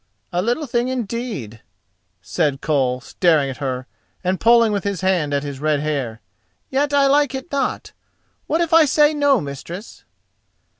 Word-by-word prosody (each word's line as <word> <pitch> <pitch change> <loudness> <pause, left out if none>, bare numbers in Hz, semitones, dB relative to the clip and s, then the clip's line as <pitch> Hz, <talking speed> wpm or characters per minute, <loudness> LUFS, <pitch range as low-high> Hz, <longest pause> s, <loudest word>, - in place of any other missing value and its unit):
"A 175 - +1
little 240 +9 -1
thing 240 -1 0
indeed," 230 - -4 0.6
said 140 - -1
Koll, 130 -5 0
staring 155 -3 +1
at 130 - -9
her, 130 -2 -3 0.4
and 185 +1 0
pulling 230 -1 +5
with 200 -3 -1
his 200 -3 -2
hand 180 -6 +1
at 140 0 0
his 140 -2 -6
red 150 0 +1
hair, 140 -7 -3 0.5
"yet 285 +2 +1
I 285 -1 +4
like 285 0 +3
it 265 +6 -7
not. 280 -1 -2 0.6
What 320 +3 +1
if 335 -1 -1
I 325 -1 +7
say 295 +2 +4
no, 285 -3 +3
mistress?" 170 +7 -8
190 Hz, 160 wpm, -20 LUFS, -, 0.6 s, I